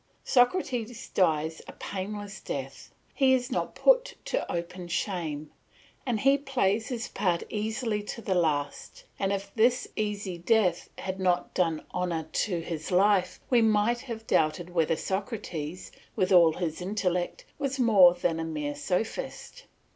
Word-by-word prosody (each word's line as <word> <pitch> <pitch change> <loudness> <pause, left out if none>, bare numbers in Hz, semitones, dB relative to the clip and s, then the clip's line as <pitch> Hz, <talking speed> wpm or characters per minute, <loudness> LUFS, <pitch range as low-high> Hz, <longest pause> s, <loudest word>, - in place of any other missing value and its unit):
Socrates 245 -4 +1
dies 160 -3 +1
a - - -9
painless 200 0 -6
death, 135 -1 -6 0.2
he 265 -1 +4
is 250 +1 -2
not - - -2
put - - +4
to - - -2
open 175 +1 -4
shame, 165 -5 -3 0.6
and 235 -3 +1
he 275 +1 +4
plays 225 -6 0
his 235 -3 -3
part 175 -3 0
easily 220 0 -1
to 210 - -6
the 205 -4 -1
last; 150 -5 -1 0.2
and 195 0 +1
if 200 0 -3
this 240 +3 +3
easy 205 -4 -3
death 180 -1 +2
had 190 0 -4
not 180 -1 +1
done 165 -4 0
honour 170 -3 -1
to 180 -5 0
his 160 -2 -5
life, 190 0 +3
we 245 -2 +5
might 220 +2 +3
have 230 -4 -7
doubted 165 0 +1
whether 165 -2 +2
Socrates, 185 -4 -4 0.2
with 185 +1 +1
all 170 -3 +7
his 165 -1 -3
intellect, 180 -2 -1
was 275 -1 -1
more 195 -8 +7
than 165 -2 0
a - - -1
mere 150 -3 -3
sophist. 220 - -3
190 Hz, 145 wpm, -28 LUFS, 170-225 Hz, 0.6 s, all